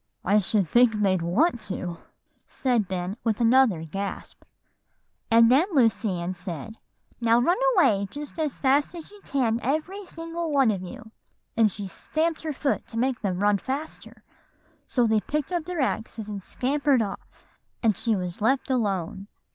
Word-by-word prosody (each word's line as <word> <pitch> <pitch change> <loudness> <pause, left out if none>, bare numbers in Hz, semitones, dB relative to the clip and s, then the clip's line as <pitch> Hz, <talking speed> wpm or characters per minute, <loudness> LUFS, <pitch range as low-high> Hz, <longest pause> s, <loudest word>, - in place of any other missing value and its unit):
"I 205 +3 +4
should 200 -1 0
think 240 +4 +4
they'd 195 -4 +1
want 235 - +1
to," 180 -3 -4 0.5
said 240 -6 0
Ben 185 +2 -3
with 220 -3 0
another 235 -7 +4
gasp. 195 +5 -6 0.9
"And 230 +1 +6
then 295 +8 +5
Lucy 225 -6 +3
Ann 175 +2 -3
said, 180 +4 -7 0.4
'Now 230 0 +4
run 345 - +2 0.2
away, 200 - +3
just 295 +3 -8
as 305 -3 -1
fast 285 +5 +2
as 335 +2 -9
you 415 -1 -15
can, 240 -5 +1
every 355 +8 -2
single 330 0 -5
one 270 -5 +4
of 195 -3 -3
you;' 220 +4 -10 0.4
and 225 -2 +4
she 200 +1 -6
stamped 315 - -2
her 315 - -3
foot 280 0 -2
to 230 - -7
make 255 +1 0
them 190 -4 -1
run 205 -1 +3
faster; 280 +8 -6 0.6
so 245 -2 +2
they 220 -1 +3
picked 300 - -3
up 345 -3 -1
their 355 -3 -2
axes 220 -3 -2
and 205 -2 -5
scampered 275 +3 +1
off, 200 - -9 0.4
and 220 -3 +3
she 225 +1 0
was 180 0 -4
left 265 +4 +1
alone. 195 -5 -1
230 Hz, 165 wpm, -25 LUFS, 200-285 Hz, 0.9 s, And